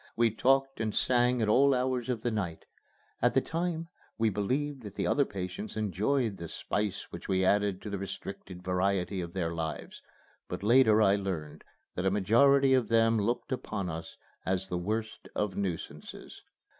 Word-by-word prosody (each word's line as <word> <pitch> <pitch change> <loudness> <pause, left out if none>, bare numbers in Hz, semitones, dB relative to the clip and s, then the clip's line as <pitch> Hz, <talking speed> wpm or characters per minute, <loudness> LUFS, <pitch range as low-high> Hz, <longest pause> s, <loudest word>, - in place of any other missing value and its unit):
We 115 -1 +3
talked 135 +3 +2
and 110 -1 -2
sang 125 -1 +3
at - - +1
all 135 +5 +5
hours 125 -1 -1
of 120 -3 -2
the 120 - 0
night. 95 -7 -3 0.6
At - - +3
the - - +7
time 165 0 -2 0.3
we 115 -1 +2
believed 130 +8 -1
that 105 -3 -9
the - - -1
other 140 - +3
patients 95 +1 -6
enjoyed 110 - 0
the 85 - -6
spice 105 +4 -2
which - - -8
we 95 0 +2
added 100 -1 +2
to 105 - -5
the 100 - -3
restricted 95 -1 -7
variety 95 +1 0
of 85 0 -6
their 85 -3 -1
lives, 80 -3 -5 0.5
but - - -5
later 110 -1 +5
I 100 0 +4
learned 90 -7 -4 0.3
that 90 +2 -1
a - - +5
majority 130 +8 +4
of 130 -3 +3
them 115 0 +3
looked 115 +6 -1
upon 105 -8 -3
us 80 +1 -7 0.3
as 95 +1 -1
the 90 - -1
worst 110 +4 -3
of 105 -3 -1
nuisances. 85 -6 -5
105 Hz, 175 wpm, -30 LUFS, 95-125 Hz, 0.6 s, the